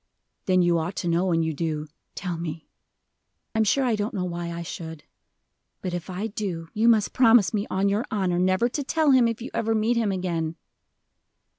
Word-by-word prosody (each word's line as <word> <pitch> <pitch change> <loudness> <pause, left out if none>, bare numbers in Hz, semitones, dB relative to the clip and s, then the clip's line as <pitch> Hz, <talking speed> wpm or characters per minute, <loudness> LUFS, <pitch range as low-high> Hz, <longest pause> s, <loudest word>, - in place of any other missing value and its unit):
"Then 185 -1 +4
you 170 -1 +3
ought 175 +4 -3
to 175 - -3
know, 175 +2 +2
and 165 -1 +2
you 160 - -1
do. 155 0 -2 0.3
Tell 180 -2 -3
me." 165 -1 -5 0.9
"I'm 220 -1 +3
sure 270 +6 +2
I 240 -3 +2
don't 210 +1 -3
know 185 -2 -1
why 170 -1 -4
I 170 0 -5
should. 160 -2 -7 0.8
But 180 - -3
if 175 +1 -5
I 185 +3 -3
do, 190 -6 -4
you 220 +2 +2
must 220 -3 +4
promise 230 -6 +5
me, 205 -1 -1
on 190 +1 +1
your 205 +4 +1
honor, 185 -4 0
never 185 +5 +3
to 285 +4 -3
tell 310 +1 +2
him, 255 -3 +5
if 230 0 -3
you - - -7
ever 225 -1 0
meet 225 +2 +1
him 220 -3 +1
again." 170 -4 -2
185 Hz, 200 wpm, -25 LUFS, 170-220 Hz, 0.9 s, promise